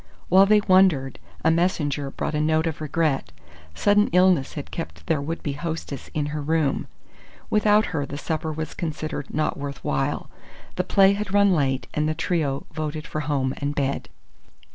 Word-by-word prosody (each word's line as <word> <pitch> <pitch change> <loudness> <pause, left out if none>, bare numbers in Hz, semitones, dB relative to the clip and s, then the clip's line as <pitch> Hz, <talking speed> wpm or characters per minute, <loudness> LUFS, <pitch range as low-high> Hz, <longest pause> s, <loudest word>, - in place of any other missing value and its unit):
While 190 +2 +7
they 210 0 +5
wondered, 185 -9 +3 0.3
a 160 - +6
messenger 150 -5 0
brought 135 - -4
a 150 - 0
note 155 +1 +2
of 160 -1 -3
regret. 150 - 0 0.4
Sudden 205 - +3
illness 180 -5 +3
had - - -7
kept 80 0 -7
their 150 - +1
would 160 +4 -4
be 145 - -2
hostess 155 -3 -5
in 150 -1 0
her 150 - -2
room. 155 -1 0 0.6
Without 210 0 +4
her, 145 -3 -1
the 140 - -6
supper 160 +1 -3
was 155 0 -5
considered 155 -3 -4
not 155 0 -1
worth 140 -3 -6
while. 70 - -1 0.5
The 180 - 0
play 195 +1 +5
had 200 -1 -3
run 200 -1 +5
late, 135 -5 0
and 150 +1 0
the 155 - -1
trio 155 -5 -1
voted 155 0 -4
for 155 - -4
home 135 -3 -1
and 145 +1 -3
bed. 140 -1 -1
155 Hz, 175 wpm, -24 LUFS, 140-175 Hz, 0.6 s, While